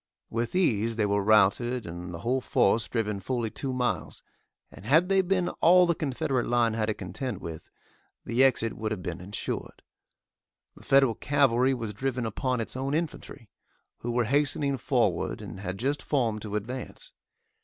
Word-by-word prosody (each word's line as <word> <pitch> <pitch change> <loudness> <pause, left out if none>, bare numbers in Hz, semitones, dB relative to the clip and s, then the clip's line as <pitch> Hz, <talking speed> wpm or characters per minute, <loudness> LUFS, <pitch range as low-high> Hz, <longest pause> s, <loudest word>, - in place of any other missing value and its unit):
With 115 +6 -2
ease 115 - +2
they 110 -2 +1
were 100 0 +1
routed 110 +4 +3
and 85 +1 -7
the 85 -1 -7
whole 130 +5 0
force 110 -1 +2
driven 105 -4 -1
fully 115 +1 -2
two 135 - -4
miles, 125 -1 -2 0.5
and 95 - -13
had 160 - +3
they 195 -1 +4
been 185 -1 0
all 180 +2 +7
the 170 - +2
Confederate 135 -4 -1
line 120 -2 +2
had 110 -1 -1
to 110 - -1
contend 105 +5 -5
with, 80 -2 -8 0.6
the 120 +3 +2
exit 115 -4 +2
would 110 0 -3
have 105 -4 -4
been 90 - -5
insured. 100 +2 -5 0.9
The - - -16
Federal 135 -3 +4
cavalry 135 -1 +2
was 115 -4 -5
driven 125 +2 -2
upon 125 +3 -1
its 115 - -3
own 135 +2 -1
infantry, 150 - -5 0.5
who 120 - -5
were 120 0 +1
hastening 140 +2 +1
forward 115 -9 0
and - - -8
had 95 -1 -5
just 140 +7 -1
formed 115 -7 0
to 105 -1 -5
advance. 125 +5 -6
120 Hz, 170 wpm, -27 LUFS, 105-135 Hz, 0.9 s, all